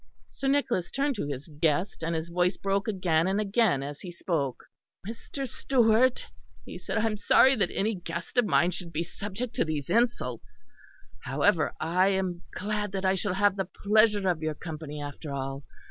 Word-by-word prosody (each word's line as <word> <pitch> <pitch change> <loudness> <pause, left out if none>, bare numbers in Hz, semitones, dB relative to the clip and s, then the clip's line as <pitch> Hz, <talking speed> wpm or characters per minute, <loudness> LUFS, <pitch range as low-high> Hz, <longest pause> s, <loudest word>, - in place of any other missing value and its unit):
Sir 275 - -4
Nicholas 265 -10 +1
turned 280 +1 0
to 170 - -2
his 140 -1 -5
guest; 160 +4 0
and 165 +1 -1
his 160 +1 -3
voice 180 +2 +1
broke 195 +1 -1
again 180 -5 +1
and 195 +2 +1
again 205 - +2
as 145 +1 -7
he 185 - -7
spoke. 160 -6 -2 0.4
"Mr. 265 +4 -5
Stewart," 245 -1 +2 0.4
he - - -8
said, - - -3
"I 225 - +2
am 220 -1 0
sorry 260 +6 +5
that 195 -4 +2
any 215 +3 0
guest 170 +4 -3
of 245 - +4
mine 175 -2 +3
should 175 -1 -6
be 165 +1 -1
subject 205 +7 -6
to - - +3
these 155 -3 -3
insults. 125 - -1 0.6
However, - - +1
I 180 +4 +2
am 190 -3 0
glad 210 0 -3
that 190 -1 -2
I 190 - +4
shall 190 0 -1
have 205 0 +3
the 195 -2 -2 0.2
pleasure 210 -1 +4
of 175 -3 +1
your 155 -1 -2
company 155 -2 -7
after 145 +1 -6
all. 135 0 -4
185 Hz, 185 wpm, -28 LUFS, 160-210 Hz, 0.6 s, sorry